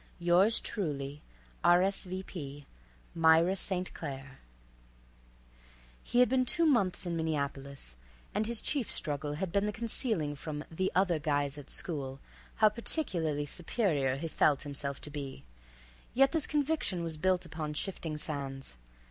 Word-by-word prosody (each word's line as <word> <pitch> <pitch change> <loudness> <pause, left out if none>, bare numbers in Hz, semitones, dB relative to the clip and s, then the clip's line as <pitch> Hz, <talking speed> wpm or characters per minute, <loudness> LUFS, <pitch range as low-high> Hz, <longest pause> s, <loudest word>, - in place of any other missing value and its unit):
Yours 180 +6 +5
truly, 145 -7 -3 0.4
R.S.V.P. 180 -5 +1 0.5
Myra 165 +3 +5
St. 185 -1 -3
Claire. 135 -3 -7 1.6
He 245 - +3
had 250 - +6
been 255 +1 +3
two 335 +7 +3
months 215 - +2
in 175 -1 -2
Minneapolis, 140 - -3 0.4
and 215 +1 0
his 235 -1 -1
chief 275 -6 0
struggle 145 -1 -2
had 175 +4 -3
been 200 +3 +2
the - - 0
concealing 215 - 0
from 150 +1 -5
"the 185 +4 0
other 180 -3 +3
guys 145 -2 0
at 145 - -12
school" 135 -5 -3 0.4
how 215 -1 +6
particularly 170 - 0
superior 150 - 0
he 160 +5 -3
felt 150 -2 +2
himself 140 -1 -4
to 150 - -6
be, 140 -2 -6 0.7
yet 270 +1 +6
this 320 -3 0
conviction 290 - 0
was 165 -2 -2
built 185 +2 +2
upon 155 -2 -4
shifting 160 -3 -3
sands. 135 - -5
165 Hz, 135 wpm, -32 LUFS, 145-195 Hz, 1.6 s, had